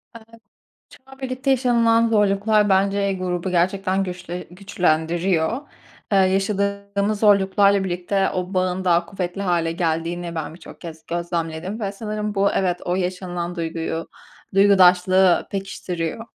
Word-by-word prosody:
Eee, 225 Hz, -, -11 dB, 0.7 s
şu -, -, -16 dB
an 270 Hz, 0 st, -15 dB
birlikte 260 Hz, +1 st, -2 dB
yaşanılan 235 Hz, -3 st, +3 dB
zorluklar 210 Hz, 0 st, +2 dB
bence 195 Hz, +1 st, +2 dB
grubu 185 Hz, -1 st, -3 dB
gerçekten 190 Hz, +2 st, +1 dB
güçle 180 Hz, -1 st, -6 dB
güçlendiriyor. 175 Hz, -, 0 dB, 0.4 s
Eee, 195 Hz, -, +5 dB
yaşadığımız 200 Hz, +1 st, 0 dB
zorluklarla 200 Hz, -1 st, +4 dB
birlikte 190 Hz, +2 st, -1 dB
o 185 Hz, +1 st, -4 dB
bağın 185 Hz, 0 st, 0 dB
daha 170 Hz, -1 st, +2 dB
kuvvetli 185 Hz, +1 st, -4 dB
hâle 170 Hz, -3 st, 0 dB
geldiğini 170 Hz, 0 st, -2 dB
ben 160 Hz, -1 st, -5 dB
birçok 175 Hz, -, -13 dB
kez 160 Hz, -2 st, -10 dB
gözlemledim 170 Hz, +3 st, -3 dB
ve 200 Hz, -2 st, -2 dB
sanırım 210 Hz, 0 st, -4 dB
bu 200 Hz, 0 st, +2 dB
evet 180 Hz, -2 st, 0 dB
o 175 Hz, -, -1 dB
yaşanılan 180 Hz, -1 st, -3 dB
duyguyu, 165 Hz, -1 st, -4 dB, 0.5 s
duygudaşlığı 185 Hz, -2 st, +5 dB
pekiştiriyor. 190 Hz, -1 st, -4 dB
190 Hz, 125 wpm, -22 LUFS, 175-200 Hz, 0.7 s, Eee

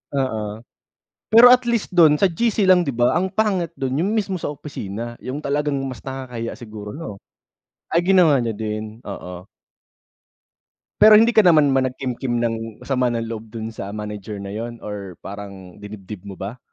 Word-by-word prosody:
Oo. 110 Hz, -5 st, -2 dB, 0.7 s
Pero 230 Hz, +3 st, +9 dB
at 250 Hz, -, +4 dB
least 235 Hz, -5 st, -1 dB
dun 160 Hz, -4 st, +6 dB
sa 195 Hz, -, +3 dB
GC 215 Hz, +4 st, +1 dB
lang 185 Hz, -1 st, +6 dB
di 135 Hz, -, -2 dB
ba? 120 Hz, +1 st, +3 dB
Ang 185 Hz, +3 st, +1 dB
pangit 190 Hz, -4 st, 0 dB
dun 135 Hz, +1 st, -2 dB
yung 200 Hz, +5 st, 0 dB
mismo 195 Hz, -4 st, -1 dB
sa -, -, -2 dB
opisina 120 Hz, -6 st, -6 dB
yung 140 Hz, +4 st, -5 dB
talagang 145 Hz, 0 st, 0 dB
mas 130 Hz, -5 st, -6 dB
nakakahiya 130 Hz, -4 st, -6 dB
siguro, 105 Hz, -4 st, -9 dB
no? 105 Hz, -11 st, -7 dB, 0.7 s
Ay 170 Hz, +1 st, +1 dB
ginawa 175 Hz, -6 st, +6 dB
niya 115 Hz, -1 st, -1 dB
din, 110 Hz, 0 st, -5 dB
oo. 90 Hz, 0 st, -8 dB, 1.6 s
Pero 215 Hz, +1 st, +9 dB
hindi 225 Hz, +2 st, +7 dB
ka 220 Hz, -3 st, +4 dB
naman 155 Hz, -5 st, +6 dB
ba 130 Hz, -, +2 dB
nag-kimkim 125 Hz, -2 st, -3 dB
ng 115 Hz, -1 st, 0 dB, 0.3 s
sama 125 Hz, -3 st, 0 dB
ng 115 Hz, -1 st, -3 dB
loob 110 Hz, -1 st, -8 dB
dun 110 Hz, -1 st, -5 dB
sa 100 Hz, -3 st, -7 dB
manager 105 Hz, -1 st, -6 dB
na 100 Hz, -, -7 dB
yun 115 Hz, +3 st, -6 dB
or 100 Hz, -3 st, -7 dB
parang 100 Hz, -2 st, -9 dB
dinibdib 105 Hz, -1 st, -10 dB
mo 100 Hz, -, -7 dB
ba? 100 Hz, +6 st, -7 dB
120 Hz, 170 wpm, -21 LUFS, 105-160 Hz, 1.6 s, Pero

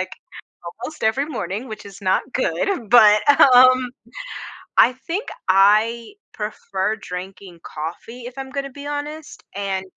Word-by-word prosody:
like, 185 Hz, 0 st, -4 dB, 0.7 s
almost 300 Hz, +1 st, -7 dB
every 240 Hz, +6 st, +1 dB
morning, 215 Hz, -, -5 dB
which 215 Hz, -3 st, -9 dB
is 200 Hz, 0 st, -12 dB
not 190 Hz, +7 st, 0 dB
good, 235 Hz, -, -1 dB
but, 220 Hz, +3 st, +6 dB
um, 255 Hz, -1 st, +6 dB, 0.9 s
I 250 Hz, -, +6 dB
think 345 Hz, -, -5 dB, 0.2 s
I 215 Hz, -, +3 dB, 0.2 s
prefer 210 Hz, -1 st, -3 dB
drinking 180 Hz, -1 st, -9 dB
coffee 175 Hz, +10 st, -8 dB
if 245 Hz, +2 st, -10 dB
I'm 270 Hz, 0 st, -6 dB
gonna 275 Hz, 0 st, -5 dB
be 285 Hz, +2 st, -9 dB
honest, 295 Hz, +1 st, -6 dB
and 195 Hz, -1 st, -3 dB
230 Hz, 130 wpm, -21 LUFS, 195-265 Hz, 0.9 s, but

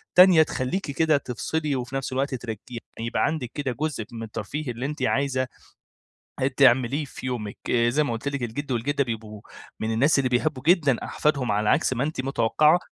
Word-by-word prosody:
تانية 180 Hz, -3 st, +8 dB
تخلّيكِ 150 Hz, +4 st, -3 dB
كده 155 Hz, +2 st, +3 dB
تفصلي، 145 Hz, +3 st, -2 dB
وفي 125 Hz, +1 st, -4 dB
نَفس 135 Hz, -1 st, -2 dB
الوقت 135 Hz, +1 st, 0 dB
ترك 115 Hz, -4 st, -6 dB
يعني 115 Hz, -1 st, -7 dB
يبقى -, -, +1 dB
عندِك 150 Hz, -7 st, -2 dB
كده 145 Hz, -3 st, -2 dB
جزء 150 Hz, -8 st, -2 dB
من 115 Hz, -1 st, -6 dB
الترفيه 115 Hz, +6 st, -4 dB
اللي 120 Hz, +2 st, -5 dB
أنت 150 Hz, +1 st, -4 dB
عايزة 130 Hz, -1 st, +1 dB, 0.9 s
آآ، 130 Hz, -, +2 dB
تعمليه 130 Hz, +1 st, +3 dB
في 135 Hz, -, -10 dB
يومِك. 115 Hz, -5 st, -4 dB
آآ، 120 Hz, -1 st, +3 dB
زي 150 Hz, +5 st, +2 dB
ما 140 Hz, -, -2 dB
قُلت 115 Hz, +4 st, -5 dB
لك، 140 Hz, -2 st, -2 dB
الجد 130 Hz, +5 st, -4 dB
والجدة 140 Hz, +4 st, 0 dB
بيبقوا 110 Hz, -4 st, -6 dB, 0.4 s
من 110 Hz, +1 st, -1 dB
الناس 140 Hz, +8 st, +3 dB
اللي 130 Hz, -2 st, +1 dB
بيحبوا 130 Hz, +2 st, 0 dB
جدًا 155 Hz, -7 st, +4 dB
أحفادهم، 140 Hz, -6 st, 0 dB
على 105 Hz, +1 st, +1 dB
عكس -, -, +3 dB
ما 125 Hz, +1 st, -1 dB
أنتِ 150 Hz, -2 st, -2 dB
متوقعة، 140 Hz, +5 st, +3 dB
130 Hz, 190 wpm, -25 LUFS, 120-145 Hz, 0.9 s, تانية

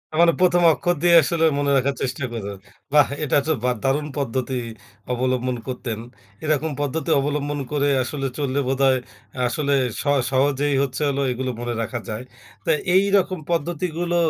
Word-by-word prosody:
তার 170 Hz, -, +4 dB
মানে 170 Hz, -, +5 dB
১ম 175 Hz, -1 st, +4 dB
অক্ষর 175 Hz, +3 st, 0 dB
দিয়ে 170 Hz, -1 st, +6 dB
আসলে 165 Hz, +1 st, +1 dB
মনে 140 Hz, 0 st, +1 dB
রাখার 135 Hz, +1 st, +1 dB
চেষ্টা 130 Hz, +1 st, -2 dB
করেন। 100 Hz, -4 st, -5 dB, 0.4 s
বাহ! 145 Hz, -2 st, +6 dB, 0.2 s
এটা 145 Hz, -, +2 dB
তো 160 Hz, -, +1 dB
বা 125 Hz, -, +2 dB
একটা 110 Hz, -, -11 dB
দারুণ 145 Hz, +3 st, +1 dB
পদ্ধতি 130 Hz, -1 st, -1 dB, 0.5 s
অবলম্বন 125 Hz, 0 st, 0 dB
করতেন। 120 Hz, -3 st, -4 dB, 0.4 s
এরকম 155 Hz, 0 st, 0 dB
পদ্ধতি 145 Hz, +1 st, -2 dB
অবলম্বন 145 Hz, +1 st, -1 dB
করে 145 Hz, -1 st, +1 dB, 0.2 s
আসলে 135 Hz, +2 st, -3 dB
চললে 140 Hz, -1 st, -1 dB
বোধহয় 135 Hz, -1 st, +3 dB, 0.5 s
আসলে 140 Hz, +3 st, 0 dB, 0.3 s
সহ 145 Hz, -1 st, +2 dB, 0.2 s
সহজেই 140 Hz, +2 st, +2 dB
হচ্ছে 135 Hz, +2 st, -3 dB
হলো 140 Hz, 0 st, -1 dB
এগুলো 130 Hz, +1 st, -2 dB
মনে 120 Hz, 0 st, -2 dB
রাখা 120 Hz, +2 st, -3 dB
যায়। 110 Hz, +3 st, -4 dB, 0.4 s
তো -, -, -3 dB, 0.3 s
এইরকম 195 Hz, -2 st, +3 dB
পদ্ধতিগুলো 170 Hz, +1 st, -1 dB
140 Hz, 160 wpm, -22 LUFS, 130-155 Hz, 0.5 s, দিয়ে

